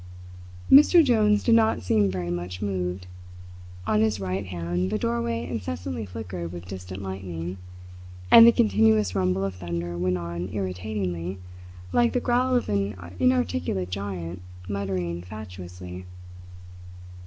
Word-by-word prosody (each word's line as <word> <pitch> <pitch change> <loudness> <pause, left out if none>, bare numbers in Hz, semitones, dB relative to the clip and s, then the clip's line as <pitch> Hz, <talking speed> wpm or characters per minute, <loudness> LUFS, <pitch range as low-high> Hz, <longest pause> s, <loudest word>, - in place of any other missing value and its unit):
Mr 305 +4 +8
Jones 215 -4 +3
did 235 - +4
not 225 - +3
seem 100 +2 +2
very 90 -2 -3
much 90 +1 -4
moved. 90 -2 -3 0.8
On 105 - +2
his 110 -2 +1
right 95 +1 -3
hand 90 +1 -2
the 105 - 0
doorway 115 +1 -1
incessantly 90 -2 -4
flickered 90 -4 -6
with 90 0 -8
distant 95 +1 -7
lightning, 95 -2 -5 0.7
and 230 0 +11
the - - +9
continuous 105 - +3
rumble 90 +1 +1
of 95 - -3
thunder 85 -1 -4
went 90 0 +1
on 85 +1 -5
irritatingly, 95 -2 -3 0.6
like 240 -1 +3
the 250 - +2
growl 250 +1 +1
of 245 - +1
an 100 0 -1 0.2
inarticulate 95 -7 0
giant 90 -3 -5 0.3
muttering 95 -4 -3
fatuously. 90 -2 -9
95 Hz, 130 wpm, -25 LUFS, 90-110 Hz, 0.8 s, and